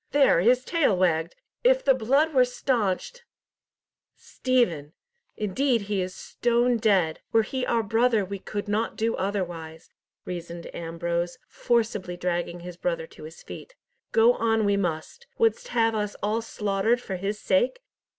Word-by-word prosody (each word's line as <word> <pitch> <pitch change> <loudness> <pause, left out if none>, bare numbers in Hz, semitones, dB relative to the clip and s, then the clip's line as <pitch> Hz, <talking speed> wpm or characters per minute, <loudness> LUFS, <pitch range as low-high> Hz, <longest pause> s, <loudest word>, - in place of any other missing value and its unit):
There, 280 -11 +5
his 250 +6 +3
tail 310 - +2
wagged! 170 -2 +1 0.3
If - - +4
the 270 - +6
blood 275 +6 +2
were 255 -2 +6
staunched—" 245 - -1 0.9
"Stephen! 175 - -1 0.4
Indeed 235 +4 +1
he 200 -1 -2
is 185 0 -4
stone 240 0 +1
dead! 190 -8 +2
Were 225 -1 +4
he 260 +3 -3
our 230 -1 +1
brother 225 0 +2
we 200 +1 -6
could 205 +2 -5
not 215 +2 -1
do 225 +1 0
otherwise," 175 -5 -4 0.3
reasoned 170 -1 -7
Ambrose, 170 +1 -3
forcibly 220 -7 -1
dragging 175 -1 -2
his 175 0 -9
brother 170 -2 -2
to 155 - -13
his 160 +2 -12
feet. - - -10 0.4
"Go 230 +2 +5
on 225 -2 +1
we 200 0 +3
must. 180 - -3
Wouldst 480 +2 +1
have 225 - +2
us 210 -1 -2
all 215 +3 0
slaughtered 210 +1 0
for 195 -6 -5
his 200 +3 -3
sake? 245 - +1
210 Hz, 150 wpm, -26 LUFS, 180-245 Hz, 0.9 s, the